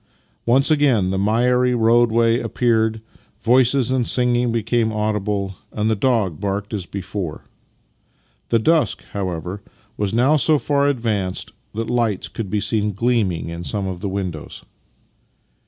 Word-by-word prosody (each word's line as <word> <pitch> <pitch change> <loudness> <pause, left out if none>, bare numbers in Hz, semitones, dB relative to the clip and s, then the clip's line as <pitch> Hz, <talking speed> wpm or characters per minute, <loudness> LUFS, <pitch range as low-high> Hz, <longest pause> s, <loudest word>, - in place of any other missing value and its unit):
Once 135 +6 +4
again 130 -11 +3
the 95 - -1
miry 125 +4 +2
roadway 115 0 +3
appeared, 110 -3 0 0.4
voices 125 +1 +3
and 130 -2 +1
singing 125 -1 +2
became 115 0 0
audible, 105 -2 -1 0.2
and 110 +1 0
the - - +2
dog 105 - 0
barked 100 +1 -3
as 95 -4 -3
before. 95 -4 -5 1.0
The 115 - +3
dusk, 160 +8 +1
however, 95 0 -4 0.4
was 100 -2 -1
now 130 +7 +3
so 150 +2 +4
far 140 0 +1
ad 140 - 0
vanced 105 -6 -2 0.2
that 115 +1 -3
lights 115 -5 0
could 110 -4 -5
be 105 - 0
seen 105 0 0
gleaming 105 -7 0
in 85 +1 -6
some 100 +2 -2
of 95 -2 -4
the 100 - -2
windows. 90 -6 -5
110 Hz, 140 wpm, -20 LUFS, 100-120 Hz, 1.0 s, Once